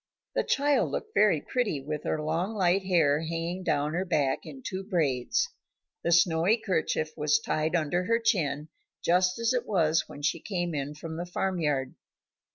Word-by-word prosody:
The - - +1
child 285 0 +2
looked 435 - -5
very 205 -7 +4
pretty, 240 - -1
with 150 +2 -5
her 155 - 0
long, 170 +7 -1
light 190 -1 +3
hair 160 -6 +3
hanging 165 +3 -3
down 155 -4 0
her 180 +3 0
back 145 -7 0
in 265 -1 -10
two 190 -2 -4
braids. 170 - 0 0.5
The 170 - +1
snowy 170 +4 +4
kerchief 185 -7 -1
was 150 -1 +2
tied 155 +2 -1
under 175 +2 0
her 230 +3 +3
chin 160 -11 0 0.4
just 180 +1 +3
as 230 +1 +1
it 250 - -1
was 165 -5 +2
when 145 - -10
she 160 +3 +1
came 175 -2 -3
in 145 0 -3
from 160 +1 -7
the 175 +1 -4
farm 185 +1 -1
yard. 140 -5 0
170 Hz, 175 wpm, -28 LUFS, 155-190 Hz, 0.5 s, very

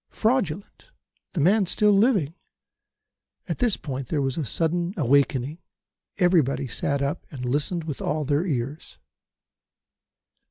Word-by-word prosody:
Fraudulent! 215 - -1 0.5
The 180 - -2
man 195 +5 +4
still 210 +4 +3
living! 200 - +3 1.1
At - - -3
this 240 -5 +2
point 135 -3 -5
there 155 - -1
was 135 -2 0
a 160 - -2
sudden 170 - -1
awakening. 140 +1 +2 0.6
Everybody 165 -8 +2
sat 140 +4 -1
up 140 +1 -3
and 125 -3 -6
listened 150 +7 -1
with 150 -4 -5
all 155 -1 -1
their 145 +3 +1
ears. 140 -3 -4
155 Hz, 125 wpm, -25 LUFS, 140-180 Hz, 1.1 s, man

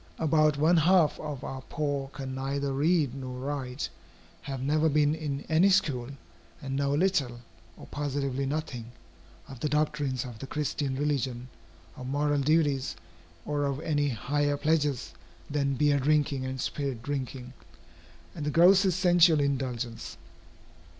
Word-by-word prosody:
About 155 -2 +3
one 160 +4 +4
half 165 -1 +4
of 145 -4 -6
our 130 0 -5
poor 145 -2 -2
can 135 -1 -7
neither 135 +1 -2
read 150 -1 +2
nor 130 -2 -6
write, 130 -1 -3 0.5
have 135 -2 -5
never 150 +4 +2
been 150 0 +3
in 150 -3 -3
any 165 +5 +4
school, 145 -11 +1 0.5
and 135 -3 -4
know 140 0 0
little, 145 -9 +1 0.4
or - - -11
positively 140 -2 -2
nothing, 135 -6 -4 0.5
of 135 -3 -10
the 150 - -1
doctrines 150 -4 0
of 120 -3 -9
the 135 - -7
Christian 145 -1 -2
religion, 130 -4 -1 0.5
of 130 -1 -7
moral 145 +1 +1
duties, 145 -2 +1 0.5
or 145 -1 -1
of 140 -1 -2
any 145 -2 +1
higher 145 +4 0
pleasures 145 - 0 0.4
than 140 -2 0
beer 145 +1 +3
drinking 140 -1 +1
and 130 0 -4
spirit 135 -4 -3
drinking, 130 -2 -4 0.8
and - - -6
the 150 - 0
grossest 185 +3 +5
sensual 175 -3 +5
indulgence. 130 -4 -2
145 Hz, 140 wpm, -28 LUFS, 130-150 Hz, 0.8 s, grossest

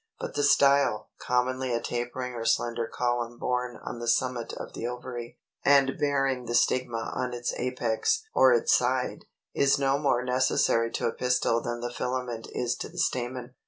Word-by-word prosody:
But - - -5
the - - 0
style, 140 -5 +3
commonly 130 +1 0
a - - 0
tapering 120 +2 -4
or 115 -1 -5
slender 115 0 0
column 120 0 -2
borne 125 0 -2
on 120 - -6
the 120 - -5
summit 125 0 0
of - - -7
the 115 - -4
ovary, 125 -1 -6 0.3
and 140 -1 +4
bearing 135 -3 +1
the 120 - -2
stigma 120 -1 +1
on 125 -1 -2
its 120 0 -2
apex 125 - 0
or - - +6
its 470 0 +3
side, - - 0 0.3
is 140 0 +3
no 135 0 +1
more 135 -4 +1
necessary 125 -2 +2
to - - -2
a 115 - 0
pistil 125 -2 +1
than 120 0 -4
the 120 0 -4
filament 125 -2 -3
is 120 -1 -1
to - - -6
the - - -15
stamen. 125 0 -2
125 Hz, 175 wpm, -27 LUFS, 120-130 Hz, 0.3 s, or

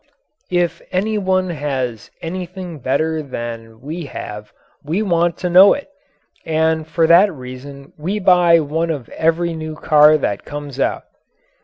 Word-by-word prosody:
If 175 -1 0
any 210 +4 0
one 185 -2 0
has 135 -7 -3
anything 180 -1 -6
better 155 +5 0
than 115 -4 -7
we 155 +4 -6
have 105 -5 -8 0.3
we 165 +9 -1
want 170 -3 +1
to 180 - -2
know 185 +3 +7
it, 285 - -9 0.5
and 160 0 0
for 165 0 +1
that 175 +5 +6
reason 135 0 -10
we 185 +7 -2
buy 180 -4 +5
one 160 +3 -2
of 145 -7 -4
every 165 +1 0
new 155 -1 -6
car 155 0 +5
that 100 -8 -2
comes 145 -2 -7
out. - - 0
160 Hz, 145 wpm, -19 LUFS, 140-175 Hz, 0.5 s, know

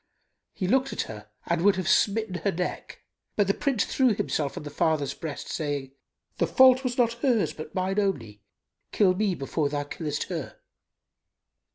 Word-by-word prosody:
He 185 - -2
looked 265 +5 +2
at - - -1
her 105 -1 -10 0.2
and 170 0 0
would 200 +2 +5
have 185 -3 -3
smitten 215 +1 +2
her 200 - +2
neck: 180 +1 -5 0.3
but 205 - +3
the 195 - +2
Prince 270 -5 0
threw 255 -5 +2
himself 145 -6 -2
on - - -5
the 145 - -7
father's 155 -3 +1
breast, 155 -3 -6
saying, 145 -4 -3 0.5
"The - - +1
fault 260 0 +6
was 245 -2 -2
not 235 -2 +3
hers 245 -6 +2
but 155 0 -9
mine 190 +2 0
only: 115 - -2 0.5
kill 190 -3 +4
me 195 -1 0
before 145 +1 -1
thou 145 0 -2
killest 150 0 -3
her." 165 -7 -6
185 Hz, 175 wpm, -27 LUFS, 150-215 Hz, 0.5 s, fault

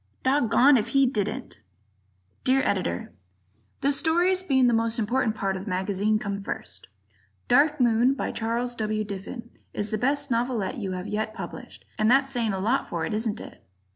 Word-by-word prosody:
Doggoned 265 0 +4
If 215 - -3
He 275 - +6
Didn't! 240 +1 -3 0.8
Dear 265 +1 +3
Editor: 90 - -1 0.7
The 280 - +3
stories, 350 +5 +2
being 270 -8 +3
the 240 - +4
most 225 0 +1
important 225 0 0
part 195 -2 -1
of 190 +1 -6
the - - -5
magazine, 200 +3 0
come 200 -2 -4
first: 95 - -5 0.6
"Dark 300 +1 +4
Moon," 240 +2 +3
by - - -3
Charles 235 +2 -2
W. 215 -2 -1
Diffin, 210 +4 -7 0.2
is 205 +1 -3
the 215 - -1
best 280 +2 0
novelette 235 0 -1
you 195 -4 -3
have 180 0 -5
yet 215 +1 -3
published, - - -9
and 215 +1 +3
that's 270 +2 +4
saying 235 -4 0
a 190 - -2
lot 230 +8 0
for 165 -2 -2
it, - - -3
isn't 220 0 -1
it? - - -11
230 Hz, 175 wpm, -26 LUFS, 205-265 Hz, 0.8 s, He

